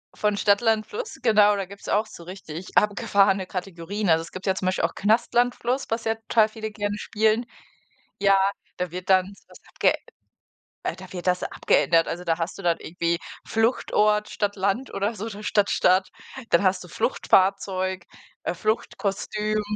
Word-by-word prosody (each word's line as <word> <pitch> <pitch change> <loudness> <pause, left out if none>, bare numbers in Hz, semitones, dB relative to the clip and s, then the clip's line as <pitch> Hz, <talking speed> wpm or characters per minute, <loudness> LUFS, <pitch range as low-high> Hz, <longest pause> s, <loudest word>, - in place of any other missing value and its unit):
Von 210 -1 0
Stadt 200 +1 +3
Land 220 -2 +2
Fluss, 485 +4 -6
genau, 210 -3 +5
da 195 -1 -2
gibt's 200 +2 -11
auch 210 +2 +2
so 210 - -12
richtig 180 -1 -8
abgefahrene 195 -1 +3
Kategorien. 185 +2 -4
Also, 160 0 +4
es 165 - -10
gibt 185 - -8
ja 190 - +3
zum 185 -1 -3
Beispiel 185 -2 0
auch 165 - +1
Knast 215 +4 +1
Land 245 +1 +3
Fluss, 255 +3 -2
was 225 +1 -2
ja 225 - +1
total 225 0 +2
viele 220 0 -6
gerne 205 -1 -3
spielen. 220 +2 +1 0.7
Ja, 195 -1 +5 0.4
da 180 -2 -3
wird 180 +1 -7
dann 190 0 +4
so - - -22
was - - -16
abge - - +2 0.9
äh, - - -3
da - - -12
wird 180 -1 -6
das 180 0 +1
abgeändert. 165 -1 +2
Also, 175 +1 -4
da 165 -1 0
hast 165 +3 -4
du - - -8
dann 170 -2 +1
irgendwie 170 0 -1 0.3
Fluchtort, 215 -2 +1
statt 205 -1 -2
Land 200 +7 -1
oder 200 +3 -1
so, 215 +1 -6
oder 210 -1 -7
statt 205 -1 +2
Staat. 185 +1 +3 0.4
Dann 170 - +4
hast 185 -1 +2
du 180 - -12
Fluchtfahrzeug, 190 -1 +1 0.4
äh, - - -2
Fluchtkostüm, 215 +1 -1
200 Hz, 180 wpm, -24 LUFS, 185-215 Hz, 0.9 s, genau